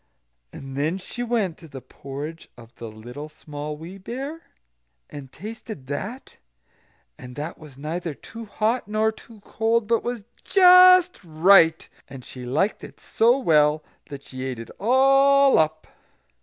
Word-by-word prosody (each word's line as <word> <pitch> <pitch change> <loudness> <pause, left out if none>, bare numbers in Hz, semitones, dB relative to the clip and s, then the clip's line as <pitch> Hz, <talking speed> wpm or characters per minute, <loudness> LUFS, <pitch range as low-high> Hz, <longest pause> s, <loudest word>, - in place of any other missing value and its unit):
And 135 -1 -10
then 155 +6 -1
she 195 +6 -8
went 225 -8 -1
to 165 - -13
the 135 -3 -9
porridge 140 +5 -9
of 115 -1 -15
the 115 - -8
Little 120 +8 -10
Small 150 0 -8
Wee 175 +5 -10
Bear, 270 - -7 0.7
and 135 -3 -10
tasted 215 - -9
that: 205 - -7 0.8
and 125 0 -11
that 150 +4 -6
was 150 -4 -14
neither 160 +2 -5
too 230 +9 -11
hot 220 +3 -1
nor 215 +1 +1
too 220 -1 -17
cold, 225 +2 -1
but 230 +1 0 0.4
just 365 -1 +6
right; 165 0 +4 0.2
and 135 -2 -11
she 125 -1 -9
liked 160 - -1
it - - -12
so 235 +3 +2
well, 150 - +2 0.2
that 140 -1 -9
she 130 -1 -8
ate 130 -2 -4
it 115 - -9
all 275 +4 +4
up. 155 0 0
165 Hz, 145 wpm, -23 LUFS, 145-230 Hz, 0.8 s, just